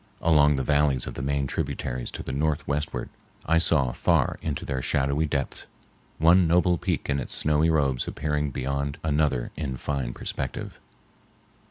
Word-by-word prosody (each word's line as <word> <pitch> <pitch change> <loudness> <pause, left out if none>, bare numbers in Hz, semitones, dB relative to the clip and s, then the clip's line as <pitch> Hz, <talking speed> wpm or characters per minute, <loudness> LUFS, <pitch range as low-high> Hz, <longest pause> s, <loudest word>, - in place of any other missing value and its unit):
Along 75 -3 +5
the 65 - -1
valleys 75 -3 +2
of - - -6
the - - -5
main 70 +1 0
tributaries 60 -1 -3
to - - -6
the - - -5
northwestward 75 +1 -1 0.4
I 85 +2 +3
saw 75 -6 +3
far - - +1
into 75 -4 -3
their 65 -2 -2
shadowy 70 +4 +1
depths, 70 -2 -3 0.5
one 85 +2 +5
noble 90 0 +3
peak - - -2
in 70 0 0
its 65 - -2
snowy 75 +2 +2
robes 70 -6 +1
appearing 75 0 -1
beyond 70 +2 -3
another 75 -5 0
in 70 -4 -4
fine 65 -3 -3
perspective. 65 -2 -5
70 Hz, 155 wpm, -26 LUFS, 65-75 Hz, 0.5 s, Along